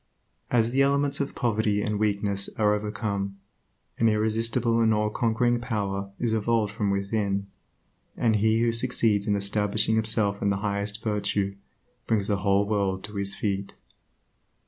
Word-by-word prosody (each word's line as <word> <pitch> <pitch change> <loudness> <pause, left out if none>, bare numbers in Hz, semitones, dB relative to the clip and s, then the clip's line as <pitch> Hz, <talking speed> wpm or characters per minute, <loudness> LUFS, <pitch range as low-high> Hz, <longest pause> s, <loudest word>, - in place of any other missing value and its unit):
As 115 -1 +2
the 135 +2 +2
elements 140 +1 +2
of 140 - -3
poverty 110 -4 +1
and 105 -1 -1
weakness 100 -1 0
are 105 -1 +3
overcome, 105 -2 -3 0.6
an 115 - +4
irresistible 115 +2 +1
and 110 -1 +4
allconquering 115 +3 +1
power 100 -4 -2
is 115 -2 0
evolved 110 -1 +1
from 105 -2 -1
within, 100 0 -1 0.7
and 110 -2 +2
he 110 +2 +2
who 120 0 +3
succeeds 115 -3 +1
in 105 - +2
establishing 105 +2 0
himself 110 -2 +1
in 100 - +2
the 100 - +1
highest 100 +2 -2
virtue, 100 -2 -1 0.5
brings 105 -2 +1
the 100 - +2
whole 100 +1 +2
world 100 -3 0
to 105 +1 -8
his 100 0 -1
feet. 100 -1 -3
105 Hz, 145 wpm, -26 LUFS, 100-115 Hz, 0.7 s, an